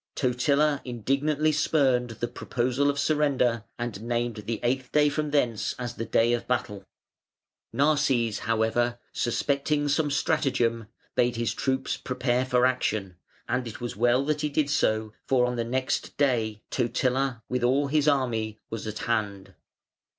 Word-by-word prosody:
Totila 140 Hz, +3 st, +2 dB
indignantly 140 Hz, +6 st, 0 dB
spurned 135 Hz, -5 st, +2 dB
the 115 Hz, +1 st, -4 dB
proposal 125 Hz, +3 st, -1 dB
of 140 Hz, -, -1 dB
surrender 140 Hz, -6 st, +1 dB
and 120 Hz, -4 st, -4 dB
named 120 Hz, 0 st, -2 dB
the 115 Hz, -2 st, -2 dB
eighth 130 Hz, +1 st, -1 dB
day 150 Hz, -1 st, +4 dB
from 150 Hz, +1 st, -2 dB
thence 125 Hz, -7 st, 0 dB
as 120 Hz, -1 st, -4 dB
the 115 Hz, -, -5 dB
day 115 Hz, +1 st, +3 dB
of 120 Hz, -, -2 dB
battle. 110 Hz, -5 st, -2 dB, 0.9 s
Narses, 140 Hz, -7 st, +2 dB
however, 115 Hz, +2 st, 0 dB, 0.2 s
suspecting 140 Hz, +4 st, 0 dB
some 145 Hz, +1 st, +1 dB
stratagem, 130 Hz, -7 st, 0 dB, 0.3 s
bade 120 Hz, 0 st, +2 dB
his 115 Hz, 0 st, -1 dB
troops 130 Hz, -1 st, -1 dB
prepare 125 Hz, 0 st, -1 dB
for 125 Hz, -1 st, +3 dB
action, 110 Hz, -8 st, -1 dB, 0.3 s
and 125 Hz, -1 st, -1 dB
it 110 Hz, -, -8 dB
was 120 Hz, -4 st, -5 dB
well 120 Hz, +5 st, +2 dB
that 150 Hz, 0 st, 0 dB
he 150 Hz, -, 0 dB
did 145 Hz, 0 st, 0 dB
so, 110 Hz, -4 st, +1 dB
for 125 Hz, -2 st, +3 dB
on 125 Hz, 0 st, -2 dB
the 120 Hz, -, -1 dB
next 130 Hz, +3 st, -2 dB
day 115 Hz, -7 st, +1 dB
Totila 125 Hz, 0 st, 0 dB
with 125 Hz, -1 st, -2 dB
all 135 Hz, +4 st, +3 dB
his 150 Hz, +1 st, +1 dB
army 115 Hz, -6 st, +1 dB
was 115 Hz, -1 st, -5 dB
at 110 Hz, 0 st, -4 dB
hand. 105 Hz, -4 st, -2 dB
125 Hz, 150 wpm, -27 LUFS, 115-140 Hz, 0.9 s, day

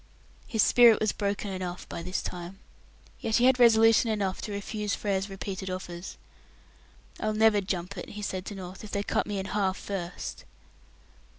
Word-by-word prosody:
His 220 Hz, -6 st, +2 dB
"spirit" 235 Hz, -3 st, +7 dB
was 215 Hz, -, +2 dB
broken 200 Hz, 0 st, -2 dB
enough 180 Hz, -1 st, -5 dB
by -, -, -6 dB
this 185 Hz, +2 st, -3 dB
time. 180 Hz, +1 st, -6 dB, 0.6 s
Yet 220 Hz, -1 st, 0 dB
he 245 Hz, -, +4 dB
had 255 Hz, 0 st, +5 dB
resolution 225 Hz, -1 st, +6 dB
enough 200 Hz, -3 st, -1 dB
to 210 Hz, -, -5 dB
refuse 205 Hz, +1 st, -2 dB
Frere's 195 Hz, -1 st, -1 dB
repeated 195 Hz, 0 st, -5 dB
offers. 180 Hz, -1 st, -6 dB, 1.0 s
"I'll 215 Hz, 0 st, -1 dB
never 215 Hz, -1 st, +5 dB
'jump' 185 Hz, 0 st, -3 dB
it," -, -, -7 dB
he 210 Hz, 0 st, -7 dB
said 185 Hz, -2 st, -3 dB
to 205 Hz, -, -5 dB
North, 185 Hz, +1 st, -8 dB
"if 215 Hz, -, -8 dB
they 200 Hz, 0 st, -1 dB
cut -, -, 0 dB
me 205 Hz, -1 st, -2 dB
in 190 Hz, -, -3 dB
half 195 Hz, -1 st, 0 dB
first." 185 Hz, -3 st, -5 dB
200 Hz, 175 wpm, -28 LUFS, 185-215 Hz, 1.0 s, spirit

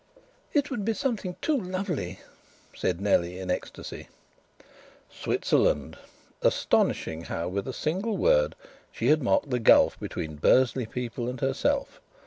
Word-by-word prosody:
"It 290 Hz, -1 st, +1 dB
would 235 Hz, -6 st, -2 dB
be 225 Hz, +2 st, 0 dB
something 220 Hz, -9 st, -2 dB
too 310 Hz, -, +2 dB
lovely!" 180 Hz, -, -3 dB, 0.5 s
said 90 Hz, -1 st, -1 dB
Nellie 90 Hz, -3 st, +1 dB
in 95 Hz, -1 st, -3 dB
ecstasy. -, -, -5 dB, 1.0 s
Switzerland! -, -, +1 dB, 0.5 s
Astonishing 80 Hz, +1 st, +1 dB
how 85 Hz, +1 st, -3 dB
with 100 Hz, +4 st, -3 dB
a -, -, -2 dB
single 190 Hz, -, -2 dB
word -, -, +3 dB, 0.4 s
she -, -, -1 dB
had 155 Hz, 0 st, +4 dB
marked 130 Hz, +2 st, +1 dB
the 125 Hz, -, +1 dB
gulf 115 Hz, -, +5 dB
between 80 Hz, -1 st, -5 dB
Bursley 125 Hz, -, +3 dB
people 120 Hz, 0 st, -4 dB
and 125 Hz, 0 st, -6 dB
herself. 275 Hz, -, -1 dB
130 Hz, 130 wpm, -27 LUFS, -, 1.0 s, gulf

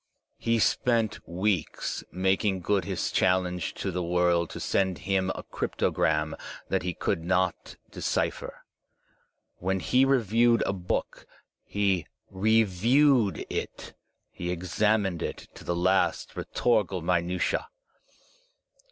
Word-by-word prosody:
He 115 Hz, 0 st, +1 dB
spent 115 Hz, -1 st, +1 dB
weeks 90 Hz, 0 st, -1 dB
making 95 Hz, +1 st, +1 dB
good 100 Hz, +2 st, +1 dB
his -, -, -2 dB
challenge 90 Hz, -3 st, +1 dB
to 95 Hz, -, -3 dB
the 90 Hz, 0 st, -2 dB
world 85 Hz, -1 st, +2 dB
to -, -, -7 dB
send 95 Hz, -3 st, 0 dB
him 95 Hz, -1 st, 0 dB
a -, -, -6 dB
cryptogram 75 Hz, 0 st, 0 dB, 0.4 s
that -, -, +1 dB
he 90 Hz, 0 st, -3 dB
could 80 Hz, -, -1 dB
not 95 Hz, 0 st, 0 dB, 0.2 s
decipher. -, -, -2 dB, 0.9 s
When 95 Hz, +1 st, -1 dB
he 125 Hz, +7 st, +3 dB
reviewed 120 Hz, -3 st, +3 dB
a -, -, 0 dB
book, 90 Hz, -2 st, -3 dB, 0.4 s
he 100 Hz, -5 st, 0 dB, 0.2 s
reviewed 110 Hz, -, +3 dB
it, -, -, -5 dB, 0.4 s
he 90 Hz, -, -5 dB
examined 95 Hz, +1 st, 0 dB
it -, -, -5 dB
to -, -, -12 dB
the 85 Hz, -, -1 dB
last 95 Hz, +2 st, +1 dB
rhetorical 105 Hz, -7 st, 0 dB
minutia. 90 Hz, +1 st, 0 dB
95 Hz, 115 wpm, -27 LUFS, 90-105 Hz, 0.9 s, he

